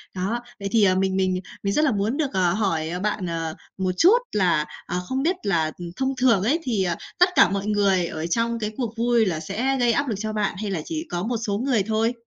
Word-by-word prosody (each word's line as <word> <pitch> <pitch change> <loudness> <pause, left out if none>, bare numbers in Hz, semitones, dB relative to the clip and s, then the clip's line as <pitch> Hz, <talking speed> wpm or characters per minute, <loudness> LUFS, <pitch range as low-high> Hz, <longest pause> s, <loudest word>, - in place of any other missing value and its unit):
Đó, 200 +6 -2 0.2
vậy 200 - -3
thì, 225 -3 +4
ờ, 185 -1 +4
mình 190 0 +1
mình 185 -1 +1 0.2
mình 200 0 0
rất 305 - +3
là 285 - +3
muốn 210 +5 -1
được, 290 -8 -1
ờ, 180 -2 +2
hỏi 180 -4 -1
bạn, 210 -2 -1
ờ, 165 -2 -3 0.2
một 185 -1 0
chút 390 - +6
là, 175 -7 +2 0.2
ờ, 180 +1 -2
không 265 +1 -1
biết 350 +5 +2
là, 165 -5 +1
ừm, 175 -1 -7
thông 265 +2 -1
thường 235 -7 +3
ấy 295 +10 +2
thì, 225 -9 0
ờ, 175 -2 0 0.2
tất 360 +1 +6
cả - - +6
mọi 200 +1 -2
người 200 -4 +2
ở 160 +1 -4
trong 230 +4 0
cái 215 0 -2
cuộc 235 -3 -3
vui 235 -1 +3
là 170 -5 -1
sẽ 255 +12 -1
gây 240 -1 +3
áp 280 +4 0
lực 225 - -1
cho 215 0 -3
bạn, 210 -3 -1
hay 205 -2 -3
là 165 -5 -2
chỉ 325 +1 -4
có 175 0 -2
một 235 +2 -1
số 210 -3 -2
người 240 -4 +1
thôi? 225 +2 +1
210 Hz, 255 wpm, -24 LUFS, 185-240 Hz, 0.2 s, chút